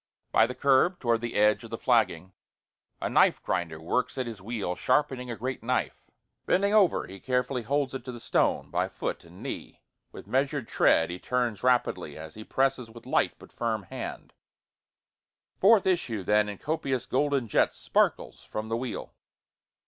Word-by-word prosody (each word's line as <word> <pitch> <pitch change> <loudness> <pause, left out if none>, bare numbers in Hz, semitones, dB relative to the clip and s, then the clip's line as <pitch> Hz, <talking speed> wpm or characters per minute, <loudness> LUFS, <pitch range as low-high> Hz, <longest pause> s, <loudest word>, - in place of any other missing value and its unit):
By 110 - +5
the 125 - -6
curb 140 +7 +3
toward 115 -2 +1
the 120 -1 -4
edge 105 +2 +3
of 115 - -9
the 115 - -4
flagging, 95 -8 +1 0.7
A - - -2
knife - - +4
grinder 85 -3 -2
works 125 +12 -1
at 130 - -1
his 115 -5 -7
wheel 100 -3 -3
sharpening 130 +1 0
a 120 - -3
great 130 +3 -4
knife, 125 +2 -2 0.4
Bending 200 +2 +2
over 200 -5 +4
he 95 +1 -10
carefully 125 +1 -1
holds 140 +4 -1
it 135 - -5
to 130 - -5
the 120 - -8
stone, - - 0
by - - 0
foot - - -4
and - - -14
knee, - - -7 0.3
With - - -10
measurâd 135 -1 0
tread 80 +1 +3
he 90 - -6
turns 120 -3 -1
rapidly, 120 -11 +1
as 80 0 -9
he 110 - -9
presses 135 -1 0
with 115 +1 -13
light - - +1
but - - -16
firm 110 -3 -2
hand, - - -7 1.3
Forth 205 +1 +6
issue 130 - 0
then 105 +2 +3
in 100 - -6
copious 140 -4 -2
golden 140 -2 +1
jets, - - +2
Sparkles - - 0
from 110 +1 -5
the 115 - 0
wheel. 120 -2 -5
120 Hz, 175 wpm, -28 LUFS, 105-135 Hz, 1.3 s, Forth